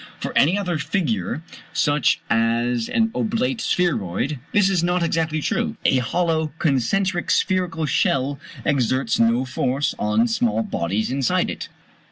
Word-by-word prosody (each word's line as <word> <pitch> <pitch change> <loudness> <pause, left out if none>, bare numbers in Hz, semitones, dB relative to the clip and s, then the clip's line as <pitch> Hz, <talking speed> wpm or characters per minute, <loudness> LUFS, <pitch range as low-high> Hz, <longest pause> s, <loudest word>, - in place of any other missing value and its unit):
For - - -5
any 165 +8 +4
other 180 -5 -1
figure, 140 - -2 0.3
such 145 -2 +2
as 115 +1 +1
an 225 -1 +1
oblate 235 +2 -1
spheroid, 140 - 0
this 205 -2 +4
is 185 -3 +1
not 175 0 +1
exactly 160 -2 0
true. - - -1
A 130 - +4
hollow 160 +4 0
concentric 175 - 0
spherical 180 -4 +1
shell 140 -1 +1 0.3
exerts 130 -3 +1
no 115 +3 +3
force 130 +2 -1
on 105 +3 +2
small 115 -1 0
bodies 100 +5 -2
inside 135 -2 +1
it. - - -7
145 Hz, 135 wpm, -22 LUFS, 120-175 Hz, 0.3 s, any